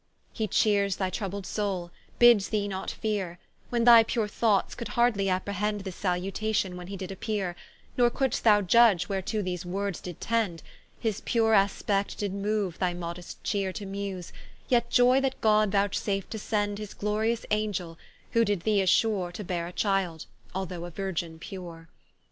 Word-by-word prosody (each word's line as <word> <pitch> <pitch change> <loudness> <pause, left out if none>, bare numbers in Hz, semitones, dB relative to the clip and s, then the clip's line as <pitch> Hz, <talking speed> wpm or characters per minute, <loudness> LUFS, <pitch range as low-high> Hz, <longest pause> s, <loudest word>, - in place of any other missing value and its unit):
He 220 - -1
cheeres 200 -1 +2
thy 190 -2 -2
troubled 200 -2 -4
soule, 190 -5 -2 0.3
bids 240 -5 +6
thee 210 -2 0
not 190 -1 -4
feare; 195 -5 -3 0.3
When 240 -1 +1
thy 235 -1 +9
pure 225 -1 -1
thoughts 210 -2 +1
could 235 - -6
hardly 220 -5 +3
apprehend 200 +2 -1
This 190 -2 -6
salutation, 190 +1 -1
when 180 0 -8
he 195 +1 -6
did 190 0 -6
appeare; 195 -2 -2 0.4
Nor 240 -1 +5
couldst 265 +1 -1
thou 210 -2 +6
judge, 195 -3 +5
whereto 200 +2 -2
those 180 -1 -3
words 195 +1 -3
did 175 -3 -8
tend; 220 -8 -1 0.4
His 220 -4 -2
pure 225 -1 +2
aspect 200 0 +1
did 200 -2 -2
mooue 200 -3 -1
thy 180 -2 0
modest 175 0 -7
cheere 200 -2 -1
To 205 - -6
muse, 195 -2 -5 0.4
yet 235 -1 +2
joy 250 +2 +5
that 270 -1 -1
God 215 -1 +4
vouchsaf'd 200 -1 0
to 220 - -4
send 205 -1 -1
His 210 -2 -7
glorious 220 +3 -1
Angel; 195 -6 -1 0.3
who 230 -1 +4
did 205 -5 0
thee 210 +1 +2
assure 190 -1 +2
To 210 - -7
beare 175 -2 -3
a - - -7
child, 190 -5 -1 0.3
although 180 -2 -4
a - - -6
Virgin 170 -2 -4
pure. 165 -2 -9
200 Hz, 170 wpm, -28 LUFS, 185-215 Hz, 0.4 s, thy